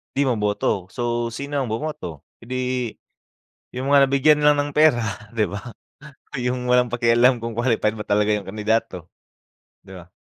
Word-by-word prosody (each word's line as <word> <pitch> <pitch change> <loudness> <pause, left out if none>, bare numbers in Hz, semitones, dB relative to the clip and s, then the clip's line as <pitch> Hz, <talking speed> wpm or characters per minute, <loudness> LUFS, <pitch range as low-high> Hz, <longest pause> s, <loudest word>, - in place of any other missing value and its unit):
'di 140 0 +2
ma-boto. 105 -4 -1
So 120 -1 -2
sino 140 +4 -6
ang 115 - -5
bumoto? 110 - -5 0.2
Eh, - - -15
'di, 130 - -1 1.2
yung 130 +2 -2
mga 140 -1 +6
nabigyan 145 +3 +4
lang 150 - +6
ng 145 0 -1
pera 150 -6 +4 0.3
'di 110 - +2
ba? 100 - -4 0.8
Yung 125 0 -2
walang 125 0 +4
pakialam 120 0 +3
kung 115 -1 -4
qualified 110 -3 +1
ba 105 - -6
talaga 105 +1 +2
yung 105 -2 -1
kandidato, 105 -3 -2 0.7
'di 95 -1 -13
ba? 85 0 -13
120 Hz, 160 wpm, -22 LUFS, 105-130 Hz, 1.2 s, mga